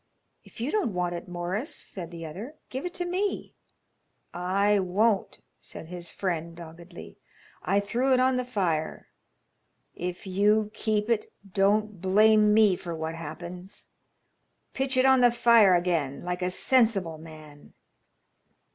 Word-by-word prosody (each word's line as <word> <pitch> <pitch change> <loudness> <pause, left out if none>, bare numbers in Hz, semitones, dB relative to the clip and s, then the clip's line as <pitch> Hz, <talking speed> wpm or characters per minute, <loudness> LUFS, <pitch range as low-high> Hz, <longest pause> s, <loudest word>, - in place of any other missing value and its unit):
"If - - -16
you 245 +6 -2
don't 380 - -1
want 180 -1 -1
it, 170 - -7
Morris," 180 - -4
said 175 -4 -6
the 170 -1 -8
other, 205 - -8 0.2
"give 265 +7 -3
it 350 - -9
to 355 -1 -1
me." 375 +3 -2 0.8
"I 200 +3 +1
won't," 195 +3 0 0.2
said 160 - -10
his 175 -1 -6
friend, 170 -3 -3
doggedly. 170 +1 -12 0.4
"I 200 - +1
threw 240 +6 -1
it 255 - +4
on 260 0 +3
the 250 - 0
fire. 180 -10 -2 0.8
If 180 +2 -6
you 210 +3 +2
keep 215 -1 -1
it, 230 -2 0 0.3
don't 205 0 +1
blame 210 +2 +4
me 210 -3 +5
for 175 -1 -6
what 160 0 -4
happens. 170 +3 -9 0.8
Pitch 265 0 -1
it 255 - +4
on 265 -1 +5
the 245 - +7
fire 230 -5 +5
again 170 -6 -1
like 180 +1 -3
a 180 - 0
sensible 195 -6 +1
man." 155 -2 -14
195 Hz, 145 wpm, -27 LUFS, 175-225 Hz, 0.8 s, the